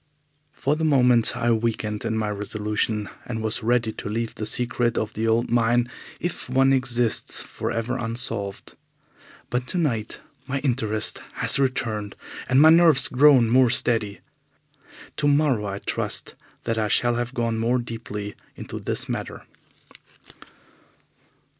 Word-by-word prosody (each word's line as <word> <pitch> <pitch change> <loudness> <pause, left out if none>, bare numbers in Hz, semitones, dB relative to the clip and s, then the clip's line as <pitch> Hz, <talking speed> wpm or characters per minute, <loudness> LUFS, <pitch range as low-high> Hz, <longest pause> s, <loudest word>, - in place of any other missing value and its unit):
For 145 +1 -1
the 160 - -3
moment 125 -6 +3
I 120 0 +1
weakened 110 -1 -1
in 110 -1 -1
my 110 -1 -1
resolution, 105 +1 -2 0.2
and 110 -2 -5
was 110 +2 -1
ready 120 0 +1
to 105 - -7
leave 115 +1 -3
the 110 - -5
secret 120 0 -1
of 110 - -2
the 110 +1 -2
old 115 +1 +1
mine, 120 +1 +2 0.3
if 175 -6 -4
one 135 +1 +4
exists, 125 -3 +1
for - - -5
ever 115 +3 -2
unsolved. 115 -4 -4 0.8
But 125 +1 -1
tonight 135 -12 -2 0.3
my 140 - -1
interest 115 -6 -1
has - - +1
returned 110 -6 -1 0.3
and 130 +1 +4
my 155 +2 +8
nerves 165 -4 +5
grown 130 -2 +5
more 125 +2 +4
steady. 110 -4 +1 1.0
Tomorrow 145 -7 +2
I 100 0 -4
trust - - -2 0.3
that 115 -1 -1
I 110 - +1
shall 120 +3 +3
have 120 +2 -3
gone 115 -1 -1
more 120 +3 +1
deeply 115 -4 -6 0.2
into - - -7
this - - -2
matter. - - -5
120 Hz, 140 wpm, -24 LUFS, 110-130 Hz, 1.0 s, my